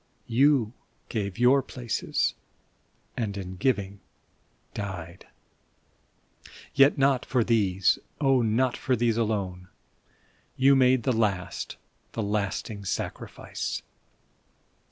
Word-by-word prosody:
You 125 -2 +3 0.4
gave 100 -4 -3
your 125 +3 +5
places, 125 -3 -2 0.8
and 105 -4 -3
in 95 -1 -6
giving 100 -3 0 0.7
died! 90 -4 -6 1.5
Yet 140 +1 +5
not 135 -2 +3
for 125 -3 +1
these, 95 -6 +2 0.2
oh, 135 -3 +3
not 120 +3 +1
for 130 - 0
these 115 -1 +1
alone. 100 -5 -2 0.9
You 135 +1 +6
made 130 -2 +4
the 130 - +2
last, 100 -5 -1 0.4
the 115 - -2
lasting 105 +1 -2
sacrifice 100 - -4
115 Hz, 95 wpm, -27 LUFS, 100-130 Hz, 1.5 s, You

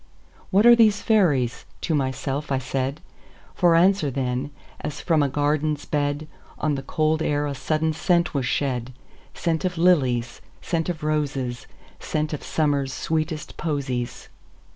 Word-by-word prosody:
"What 205 +3 +4
are 240 0 +9
these 215 -3 +4
fairies?" 140 - +2 0.2
to 165 - -1
myself 140 +1 -2
I 135 - +2
said; 135 +2 -2 0.5
For 175 -2 +4
answer, 180 -3 +4
then, 130 +1 -2 0.3
as 150 -1 -5
from 160 -3 +2
a 140 - +2
garden's 145 +1 0
bed, 145 +1 -1 0.3
On 150 -1 0
the 135 - -2
cold 155 +3 0
air 145 -1 0
a 145 - -2
sudden 155 +4 0
scent 170 +1 +1
was 135 -3 -1
shed,—Scent 130 +5 -3
of 180 -2 -1
lilies, 130 -9 +2 0.2
scent 165 0 -2
of 160 -4 -4
roses, 140 -5 -2 0.3
Scent 155 0 -2
of 150 - -4
Summer's 145 -3 0
sweetest 155 +2 -3
posies. 135 -6 -3
150 Hz, 140 wpm, -24 LUFS, 135-160 Hz, 0.5 s, are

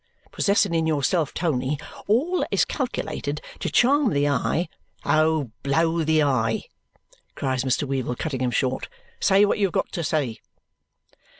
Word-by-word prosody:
Possessing 200 -2 +2
in 160 -1 +1
yourself, 155 +1 +1
Tony, 145 -4 -1 0.3
all 290 - +2
that - - -1
is - - +2
calculated - - -3 0.2
to - - -2
charm 275 +1 +4
the 145 0 +2
eye 145 +5 0 0.2
" - - -46
"Oh! 155 -5 +2
Blow 165 +4 +1
the 155 0 +3
eye!" 115 -5 +1 0.7
cries 130 -2 -1
Mr. 135 +2 0
Weevle, 130 -2 -2
cutting 135 -5 -3
him 125 - +1
short. 130 +1 -1 0.3
"Say 200 +1 +5
what 205 - 0
you 200 - +3
have 180 - -10
got - - -1
to 170 - -3
say!" 145 -8 -1
155 Hz, 160 wpm, -24 LUFS, 130-175 Hz, 0.7 s, Say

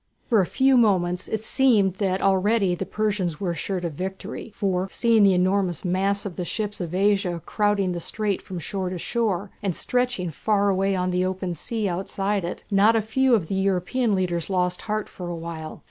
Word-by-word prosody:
For 225 -5 +3
a 180 - -1
few 265 0 +3
moments 180 -6 +2
it 220 0 -3
seemed 215 -10 +3
that 190 -2 0
already 195 0 +3
the 185 +2 -4
Persians 200 -7 -1
were 185 -3 -1
assured 180 +2 -3
of 165 - -3
victory, 190 +7 -6
for, 190 -2 -1
seeing 230 0 +3
the 195 -2 +6
enormous 185 -1 +1
mass 195 +3 0
of 190 -4 -6
the 180 - -2
ships 205 +3 -3
of 175 0 -4
Asia 195 -3 +2
crowding 205 -3 +1
the 175 -1 -4
strait 210 +2 -2
from 185 - -7
shore 185 +3 -3
to 185 - -4
shore, 205 -1 -1
and 195 -4 -1
stretching 245 -9 -1
far 205 +5 +1
away 195 0 +1
on 180 0 0
the 180 0 +1
open 185 -1 -2
sea 220 +5 -3
outside 195 +2 -1
it, 175 - -5
not 205 +3 +5
a 225 - +3
few 255 +3 +3
of 195 -7 0
the 175 - -5
European 195 +4 +1
leaders 175 -2 -1
lost 180 -1 0
heart 215 0 -1
for 180 - -8
a 175 - -3
while. 165 -1 -7
195 Hz, 200 wpm, -24 LUFS, 180-210 Hz, -, the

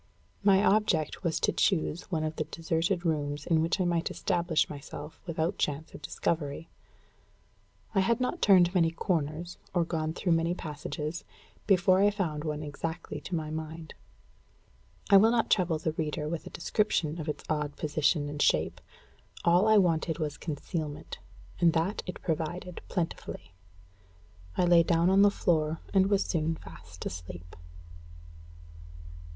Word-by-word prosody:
My 195 0 +5
object 200 -7 +2
was 165 -2 0
to - - +3
choose 175 -2 0
one 160 -4 -1
of 155 0 -3
the 155 - -1
deserted 165 +3 -1
rooms 145 -2 -1
in 160 -2 +3
which 165 +5 0
I 185 - +2
might 170 -1 0
establish 170 -2 0
myself 145 +1 -9
without 170 +3 -1
chance 150 +2 -2
of - - -10
discovery. 160 -1 -3 1.2
I 195 - +3
had 230 +5 +2
not 255 +7 -2
turned 180 -3 +6
many 170 -3 +4
corners, 165 -1 -2 0.2
or 175 -1 +3
gone 160 -1 -2
through 175 - -1
many 165 +1 +2
passages, 150 0 -5 0.4
before 185 -1 +4
I 205 - +6
found 170 -8 -2
one 150 -1 -3
exactly 160 +3 -5
to 185 - -4
my 155 -2 -3
mind. 160 0 -6 1.2
I 200 - +10
will 215 +3 +6
not 230 -1 +1
trouble 175 -5 +2
my 160 - +2
reader 150 -1 -2
with 160 +1 -4
a - - -6
description 170 -4 0
of 155 - -5
its 150 - -4
odd 150 -2 -1
position 150 0 +1
and 145 0 -4
shape. - - +2 0.6
All 175 +4 +5
I 220 0 +6
wanted 165 -4 +2
was 150 -3 -2
concealment, 155 0 -5 0.4
and 170 -2 +4
that 170 +6 0
it 180 - -7
provided 170 +2 -3
plentifully. 165 - -4 1.0
I 180 - +3
lay 175 -1 +6
down 170 +1 +3
on 195 +1 +5
the 205 - +7
floor, 160 -5 0
and 190 -1 +4
was 200 -1 +2
soon 160 -1 0
fast 85 - -11
asleep. 85 0 -7
165 Hz, 155 wpm, -29 LUFS, 155-180 Hz, 1.2 s, I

